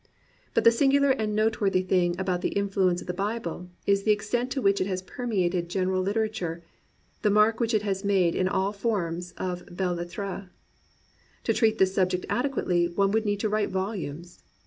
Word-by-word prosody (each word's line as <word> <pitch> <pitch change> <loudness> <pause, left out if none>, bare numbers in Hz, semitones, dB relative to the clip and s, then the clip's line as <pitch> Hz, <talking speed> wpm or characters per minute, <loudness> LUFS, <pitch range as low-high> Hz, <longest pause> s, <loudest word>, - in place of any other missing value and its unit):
But - - +3
the 230 - +8
singular 280 +3 +3
and 215 -5 -1
noteworthy 210 -4 +1
thing 180 -1 +1
about 185 -2 -1
the - - 0
influence 195 -3 +1
of - - -9
the 180 - -3
Bible 195 -3 -3 0.2
is 200 0 +3
the 215 - -2
extent 235 +4 0
to 275 - -1
which 200 -4 +2
it 185 - 0
has 185 -1 -3
permeated 185 -6 -1
gen 185 0 0
eral 185 0 +1
literature, 200 -5 -2 0.6
the 210 - +3
mark 210 +2 +4
which 230 -1 +1
it 210 - +1
has 195 -1 -2
made 190 -4 +2
in 185 - +1
all 190 +1 0
forms 180 -5 -2
of 180 -1 -3
belles 180 -1 -2
lettres. 195 +2 -5 1.0
To - - +1
treat 220 -2 +2
this 190 0 +3
subject 185 -1 +1
ade 270 +3 +1
quately 175 -9 +1
one 195 0 +3
would 220 +1 +1
need 205 -1 0
to 215 - 0
write 210 0 0
volumes. 185 -4 -4
195 Hz, 190 wpm, -27 LUFS, 180-215 Hz, 1.0 s, the